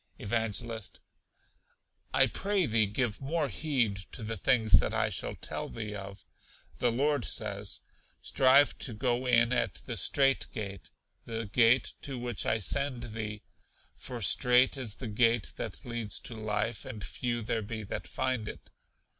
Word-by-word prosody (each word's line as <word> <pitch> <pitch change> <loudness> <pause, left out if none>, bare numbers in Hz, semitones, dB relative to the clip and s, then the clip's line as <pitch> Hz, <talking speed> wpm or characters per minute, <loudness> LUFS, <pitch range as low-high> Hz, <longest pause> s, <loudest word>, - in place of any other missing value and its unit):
Evangelist. 115 0 -3 1.1
I - - +6
pray 195 -2 0
thee 110 -3 +3
give 110 +2 -1
more 150 +1 -1
heed 120 - 0 0.2
to 115 - -6
the 115 +1 -3
things 110 0 +2
that - - -1
I - - +2
shall - - -4
tell - - -5
thee 110 -2 -5
of. 100 -1 -8 0.5
The 120 - +3
Lord 140 +2 +1
says, 100 -3 -3 0.4
'Strive 135 +2 +4
to 120 - -1
go 125 +2 0
in 120 0 +4
at 120 - 0
the - - -3
strait 135 -1 +3
gate, 100 -4 -6 0.4
the 115 -1 -3
gate 115 +4 +3
to 135 -2 -5
which 120 -3 -3
I 110 - +3
send 125 +1 -1
thee, 105 -2 -5 0.5
for 120 -3 -6
strait 125 - +5
is 120 -6 -2
the 125 - -6
gate 115 0 +2
that - - -6
leads 120 -4 -2
to - - -7
life, 110 +1 -2
and 110 -6 -7
few 120 +1 -2
there 110 +1 -1
be 110 +1 -5
that 100 - -5
find 130 -4 -1
it.' - - -9
115 Hz, 155 wpm, -30 LUFS, 105-130 Hz, 1.1 s, I